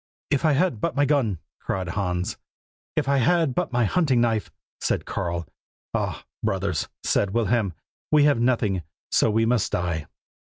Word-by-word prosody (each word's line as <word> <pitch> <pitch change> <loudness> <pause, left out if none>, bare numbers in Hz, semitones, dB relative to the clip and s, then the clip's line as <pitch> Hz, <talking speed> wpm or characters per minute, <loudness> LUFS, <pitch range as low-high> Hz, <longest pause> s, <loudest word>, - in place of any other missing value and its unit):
'If 140 +1 +2
I 155 - +5
had 150 - +1
but - - -1
my 145 +1 +3
gun!' 130 - +2 0.2
cried 95 -2 -3
Hans. 90 -1 -1 0.6
'If - - 0
I 140 0 +3
had 160 +2 +3
but - - -1
my 120 -1 +2
hunting 140 - +2
knife!' 115 -4 +1 0.3
said - - -1
Karl. 85 -1 -2 0.5
'Ah! - - -2 0.2
brothers,' 95 -4 -1
said 100 0 +1
Wilhelm, 110 -5 +1 0.4
'we 150 -1 +6
have 145 -4 +4
nothing, 115 -6 +2 0.3
so - - +4
we 110 +1 +2
must 115 -2 +1
die. 85 -4 -1
115 Hz, 160 wpm, -25 LUFS, 95-135 Hz, 0.6 s, we